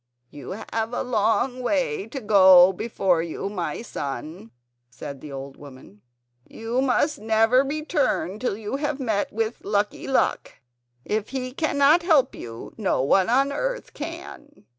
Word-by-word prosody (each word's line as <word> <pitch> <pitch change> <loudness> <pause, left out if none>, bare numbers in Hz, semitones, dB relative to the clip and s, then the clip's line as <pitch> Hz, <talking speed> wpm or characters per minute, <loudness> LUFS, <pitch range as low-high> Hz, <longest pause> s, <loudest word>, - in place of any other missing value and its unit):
"You 145 +1 -8 0.2
have 225 +1 -2
a - - -1
long 245 +2 0
way 245 - -1
before 190 - +4
you, 170 +4 -4
my 195 +2 -4
son," 140 - -6 0.4
said 135 +3 -9
the 150 - -9
old 135 0 -8
woman; 130 -8 -14 0.5
"you 230 +3 -3
must 275 +3 +1
never 225 +4 +3
return 280 - -1
till 230 -4 -2
you 220 +4 -4
have 295 -1 -2
met 220 -6 -1
with 225 +1 -3
Lucky 205 0 -1
Luck. 265 - 0 0.5
If 215 0 -2
he 255 -1 -4
cannot 295 +2 +3
help 315 -6 +3
you 115 -1 -9
no 190 -10 +1
one 185 +8 +3
on 270 +3 +3
earth - - -3
can." 295 0 -9
220 Hz, 140 wpm, -24 LUFS, 180-265 Hz, 0.5 s, before